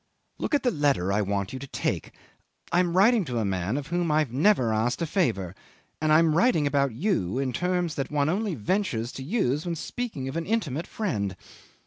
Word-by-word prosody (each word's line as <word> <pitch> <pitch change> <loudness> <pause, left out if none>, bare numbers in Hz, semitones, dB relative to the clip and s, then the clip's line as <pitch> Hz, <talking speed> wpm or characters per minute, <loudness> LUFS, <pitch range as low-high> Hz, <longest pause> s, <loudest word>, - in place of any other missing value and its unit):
"Look - - 0
at 285 - 0
the 250 - +3
letter 140 - +1
I 105 - +2
want 100 0 -2
you 130 - -5
to 140 - -8
take. - - -2 0.6
I 175 - +3
am 180 -1 +1
writing 220 +2 +5
to 125 -4 -3
a 110 - 0
man 95 +5 -1
of 145 - -4
whom 175 -1 0
I've 150 -4 +2
never 135 - +3
asked 110 +3 0
a - - +1
favour, 115 - 0 0.5
and 155 0 +2
I 155 - +7
am 165 -1 +4
writing 170 -3 +3
about 140 -3 +1
you 125 - 0
in 135 -2 -1
terms 180 +2 0
that 135 -3 -3
one 145 -1 +1
only 195 +2 0
ventures 125 - -1
to 135 - -7
use 150 - 0
when 175 -1 -2
speaking 190 - -4
of 135 - -5
an 165 0 -3
intimate 170 - -1
friend. 105 - -2
150 Hz, 210 wpm, -26 LUFS, 120-180 Hz, 0.6 s, I